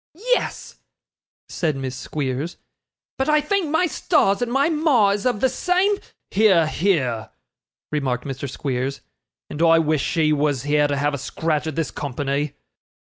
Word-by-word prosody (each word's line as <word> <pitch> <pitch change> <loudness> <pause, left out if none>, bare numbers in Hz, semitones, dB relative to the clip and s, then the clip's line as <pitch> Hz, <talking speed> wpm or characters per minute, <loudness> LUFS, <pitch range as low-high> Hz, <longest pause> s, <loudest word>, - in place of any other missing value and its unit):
'Yes,' - - -2 0.7
said 160 -5 -1
Miss 135 -1 -4
Squeers; 135 +3 -4 0.6
'but 265 - +1
I 305 0 +5
thank 335 +2 0
my 320 +4 +2
stars 300 - +2
that 245 - -1
my 270 +4 +2
ma 300 -10 +3
is 205 +4 0
of 240 -4 -1
the 260 - +5
same 370 +8 +1
' - - -53
'Hear, 190 -5 +4
hear!' 155 - 0 0.6
remarked 130 -5 -1
Mr. 135 0 -5
Squeers; 135 0 -3 0.5
'and 150 - -6
I 165 -1 +6
wish 155 -2 +1
she 155 -3 +1
was 145 -3 0
here 145 0 +2
to 145 -1 -1
have 145 +1 0
a 140 - -3
scratch 155 +3 -2
at 160 - -4
this 165 -5 -2
company. 140 +1 -2
155 Hz, 160 wpm, -22 LUFS, -, 0.7 s, I